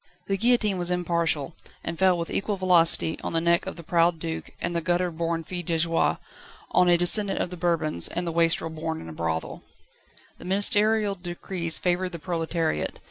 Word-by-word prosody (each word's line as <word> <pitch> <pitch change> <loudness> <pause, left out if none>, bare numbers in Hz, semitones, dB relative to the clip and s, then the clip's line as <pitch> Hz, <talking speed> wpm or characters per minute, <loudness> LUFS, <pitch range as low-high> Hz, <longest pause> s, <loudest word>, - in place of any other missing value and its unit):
The 195 - -1
guillotine 215 -3 +2
was 175 0 0
impartial, 170 -4 0 0.3
and 165 - -5
fell 185 -2 +4
with 170 0 -4
equal 200 0 -1
velocity 170 -3 +3
on - - -4
the 165 - +2
neck 170 +1 +1
of - - -5
the 170 - -10
proud 170 +1 +2
duke 160 0 -5
and 175 - -3
the 170 - 0
gutter 175 +1 0
born 165 0 -2
fille 175 +2 -4
de 165 -1 -1
joie, 165 +1 +1 0.5
on 180 -1 +4
a 175 - +5
descendant 195 +3 +4
of 180 - -2
the - - -5
Bourbons 165 - +1
and 175 +1 -3
the 170 - -2
wastrel 165 0 +1
born 160 0 -4
in 80 - -9
a - - -8
brothel. 80 0 -3 0.8
The - - -11
ministerial 205 +2 +2
decrees 175 -2 -2
favoured 180 0 -1
the - - -4
proletariat. 165 - -2
170 Hz, 190 wpm, -25 LUFS, 165-180 Hz, 0.8 s, a